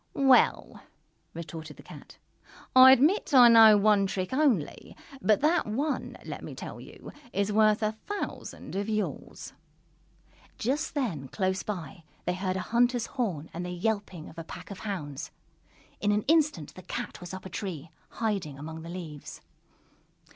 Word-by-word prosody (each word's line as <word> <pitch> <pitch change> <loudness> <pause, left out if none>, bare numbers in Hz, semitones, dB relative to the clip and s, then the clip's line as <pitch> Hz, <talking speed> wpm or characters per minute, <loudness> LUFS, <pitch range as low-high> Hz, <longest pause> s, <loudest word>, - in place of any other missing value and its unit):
"Well," 270 -2 +3 0.5
retorted 160 -2 -8
the - - -13
Cat, - - -13 0.6
"I 260 0 +10
admit 295 - +3
I 245 -2 +9
know 225 -2 +8
one 205 -1 +3
trick 185 +3 -3
only, 260 - 0 0.2
but 215 +2 +3
that 320 0 +2
one, 275 +8 -2
let - - -7
me - - -8
tell - - -8
you, - - -12 0.2
is 200 +1 0
worth 215 0 +3
a 215 - +1
thousand 400 - -7
of 200 +2 -2
yours!" 205 -13 -4 1.0
Just 280 +8 -2
then, 185 - -2
close 190 +4 -1
by, 170 -6 -6 0.2
they 180 - 0
heard 185 0 -2
a 190 - -2
hunter's 240 +2 +1
horn 190 - -3
and 175 - -4
the 180 - -5
yelping 180 -2 -3
of 165 - -11
a - - -5
pack 165 - -10
of 200 - -8
hounds. 150 -10 -5 0.7
In 205 - +1
an 210 0 +1
instant 295 - +1
the 185 - -11
Cat - - -6
was 175 - -8
up 190 0 -8
a - - -6
tree, 170 -4 -6 0.2
hiding 195 -11 -3
among 160 +3 -8
the 165 - -9
leaves. 165 -5 -8
200 Hz, 160 wpm, -28 LUFS, 170-235 Hz, 1.0 s, I